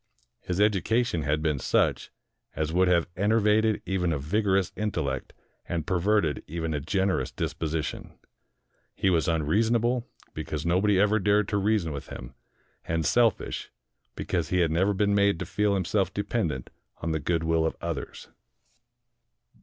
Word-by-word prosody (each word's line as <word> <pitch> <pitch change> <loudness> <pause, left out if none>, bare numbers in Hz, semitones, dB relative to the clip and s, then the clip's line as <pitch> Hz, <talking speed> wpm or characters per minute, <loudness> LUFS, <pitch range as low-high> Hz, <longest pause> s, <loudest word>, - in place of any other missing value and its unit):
His 90 +1 -4
education 105 -1 +2
had 75 +1 0
been 75 -4 0
such - - +1 0.5
as 80 +1 -2
would 90 +1 +3
have 85 -2 +3
enervated 105 +2 +2
even 90 -2 0
a 80 - 0
vigorous 95 +5 +1
intellect 80 -11 -2 0.4
and 85 -3 -2
perverted 95 -4 +1
even 80 0 -3
a 75 - -1
generous 95 +5 0
disposition. 80 -1 -4 0.8
He 95 - +1
was 85 -1 +2
un 80 -2 +1
reasonable, 115 +8 +1 0.3
because 75 0 -4
nobody 95 +3 +3
ever 105 +2 +3
dared 105 +1 +2
to 100 - 0
reason 100 -4 +1
with 70 -2 -6
him, 60 +1 -9 0.5
and 80 -1 -1
selfish, 115 +6 +1 0.5
because 85 -3 -2
he 90 0 +2
had 80 -2 +2
never 95 +5 +2
been 100 +1 +2
made 100 -2 +3
to - - -4
feel 105 -1 +1
himself 95 +1 0
dependent 100 - -2 0.3
on 80 - -1
the 80 - 0
good 80 +2 -1
will 80 0 +2
of 80 - -1
others. - - -5
90 Hz, 150 wpm, -27 LUFS, 80-105 Hz, 0.8 s, would